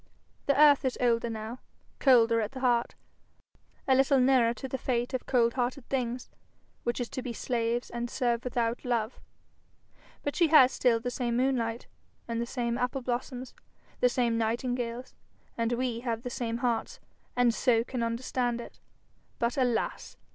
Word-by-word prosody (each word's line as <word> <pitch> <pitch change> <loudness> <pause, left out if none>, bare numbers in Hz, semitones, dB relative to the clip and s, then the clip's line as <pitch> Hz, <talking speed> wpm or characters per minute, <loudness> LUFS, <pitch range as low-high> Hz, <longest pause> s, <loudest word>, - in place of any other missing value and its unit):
The 280 0 +3
earth 295 -2 +7
is 260 -2 -1
older 235 -1 +2
now, 225 +2 -6 0.4
colder 230 -4 +5
at 215 +3 -4
the 260 - -7
heart, 240 -2 +1 0.9
a 265 - +5
little 270 +1 +4
nearer 250 -2 +4
to 265 +3 -6
the 265 0 -4
fate 245 -1 -1
of 255 - -3
cold 235 -2 +3
hearted 250 +1 -2
things, 250 -2 -2 0.5
which 240 +1 -2
is 245 - -2
to 260 - -5
be 245 -2 -5
slaves 235 0 -2
and 240 0 -3
serve 240 -2 0
without 235 -1 -1
love; 235 -2 -1 1.0
but 285 - -2
she 340 - +4
has 280 -5 +7
still 235 -3 +2
the 245 +2 -3
same 240 -1 -1
moonlight, 245 -3 0 0.4
the 235 0 -2
same 235 -1 -2
apple 250 +2 -1
blossoms, 250 +1 -4 0.5
the 250 - +4
same 240 -2 +1
nightingales, 240 +2 -2 0.4
and 230 0 0
we 240 -1 -1
have 235 -1 -3
the 245 - -5
same 230 -1 -2
hearts, 235 -2 -1 0.4
and 245 -1 +3
so 230 -2 +2
can 250 0 -4
understand 240 +1 -1
it. 235 - -10 0.6
But, 235 +3 0
alas! 245 -4 -1
245 Hz, 160 wpm, -29 LUFS, 235-255 Hz, 1.0 s, earth